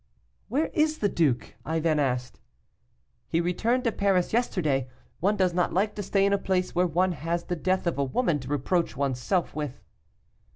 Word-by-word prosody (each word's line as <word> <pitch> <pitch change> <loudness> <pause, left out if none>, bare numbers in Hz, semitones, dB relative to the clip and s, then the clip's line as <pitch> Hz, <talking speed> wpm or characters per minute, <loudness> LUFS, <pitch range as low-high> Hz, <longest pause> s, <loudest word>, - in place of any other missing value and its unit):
'Where 290 +8 0
is 310 0 +2
the 205 - +1
duke?' 135 - 0
I 160 +1 -1
then 155 -1 +1
asked. 125 -3 -1 0.9
'He 165 - +1
returned 220 +9 +1
to 230 - +2
Paris 195 -3 +1
yesterday. 155 - +1 0.3
One 200 +4 +2
does 185 -2 +2
not 180 0 +1
like 205 +3 +1
to 210 - -5
stay 195 0 +2
in 200 - +2
a 200 - +2
place 185 -2 0
where 180 +1 +2
one 180 +3 +2
has 170 +1 -2
the 175 - -3
death 185 +3 0
of 170 -4 -1
a - - +3
woman 150 - 0
to 130 - -9
reproach 145 +3 0
one's 135 -3 0
self 180 +4 0
with. 150 -4 -5
175 Hz, 195 wpm, -27 LUFS, 150-200 Hz, 0.9 s, a